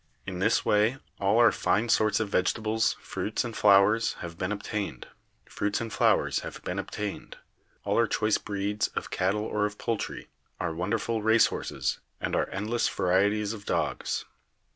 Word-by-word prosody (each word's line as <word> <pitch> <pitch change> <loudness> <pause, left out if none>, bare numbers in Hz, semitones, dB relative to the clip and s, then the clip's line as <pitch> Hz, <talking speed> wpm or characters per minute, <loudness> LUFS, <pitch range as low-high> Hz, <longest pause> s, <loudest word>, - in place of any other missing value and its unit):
In 95 -2 -5
this 110 +4 +2
way 105 +5 +3 0.2
all 100 +2 +2
our 120 -2 +7
fine 110 +4 +1
sorts 110 -2 +3
of 110 - 0
vegetables, 110 +4 +1
fruits 110 - -2
and 120 -2 -6
flowers 105 +2 +5
have 85 -1 -8
been 90 +3 -3
obtained, 105 - -4 0.5
all 100 - 0 2.3
our 115 0 +4
choice 105 +1 +1
breeds 105 +1 -1
of - - -4
cattle 100 +3 0
or 105 -1 0
of 105 0 -10
poultry, 115 -2 -3 0.3
our 85 -2 -2
wonderful 105 +6 -1
race 110 +1 +5
horses - - -2 0.2
and - - -2
our - - 0
endless 110 +4 -1
varieties 100 +3 +1
of 105 -2 -9
dogs. - - -1
105 Hz, 140 wpm, -28 LUFS, 100-110 Hz, 2.3 s, our